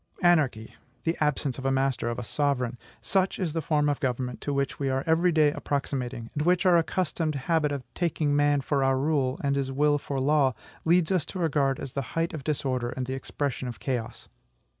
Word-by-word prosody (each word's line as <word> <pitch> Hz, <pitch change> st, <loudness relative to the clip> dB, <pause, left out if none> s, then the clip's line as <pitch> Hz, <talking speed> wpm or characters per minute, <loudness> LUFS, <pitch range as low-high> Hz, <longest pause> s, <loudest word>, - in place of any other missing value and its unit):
ANARCHY, 145 Hz, -11 st, +2 dB, 0.3 s
the 165 Hz, +1 st, 0 dB
absence 145 Hz, -3 st, 0 dB
of 135 Hz, -, -7 dB
a -, -, +3 dB
master, 135 Hz, -3 st, 0 dB
of 120 Hz, -, -3 dB
a 125 Hz, -, -4 dB
sovereign, 125 Hz, -2 st, -1 dB, 0.2 s
such 190 Hz, -1 st, +1 dB
is 175 Hz, -6 st, -2 dB
the 165 Hz, -, -1 dB
form 150 Hz, -1 st, +1 dB
of 145 Hz, -1 st, 0 dB
government 125 Hz, -1 st, -2 dB
to 145 Hz, -, -2 dB
which 140 Hz, -1 st, -1 dB
we 140 Hz, -1 st, 0 dB
are 135 Hz, +1 st, 0 dB
every 165 Hz, +2 st, +3 dB
day 155 Hz, -2 st, +4 dB
approximating, 130 Hz, -5 st, -3 dB
and 150 Hz, -, -2 dB
which 180 Hz, +4 st, +2 dB
our 180 Hz, -2 st, +6 dB
accustomed 165 Hz, -2 st, 0 dB
habit 150 Hz, +2 st, +1 dB
of 140 Hz, -2 st, -3 dB
taking 155 Hz, -4 st, 0 dB
man 145 Hz, -1 st, +3 dB
for 140 Hz, 0 st, 0 dB
our 135 Hz, 0 st, +3 dB
rule, 135 Hz, -2 st, 0 dB
and 140 Hz, 0 st, +1 dB
his 135 Hz, -1 st, -1 dB
will 145 Hz, +2 st, +2 dB
for 140 Hz, 0 st, -4 dB
law, 135 Hz, -1 st, +3 dB, 0.3 s
leads 170 Hz, 0 st, +3 dB
us 185 Hz, -5 st, +2 dB
to 190 Hz, -, -7 dB
regard 140 Hz, -6 st, +1 dB
as 135 Hz, -, -6 dB
the 140 Hz, -, -1 dB, 0.2 s
height 165 Hz, +2 st, 0 dB
of 155 Hz, -4 st, -5 dB
disorder 130 Hz, -5 st, -1 dB
and 130 Hz, +1 st, -4 dB
the 130 Hz, -, -4 dB
expression 135 Hz, -1 st, -3 dB
of 120 Hz, -, -7 dB
chaos. 125 Hz, -4 st, -4 dB
140 Hz, 210 wpm, -27 LUFS, 130-155 Hz, 0.3 s, our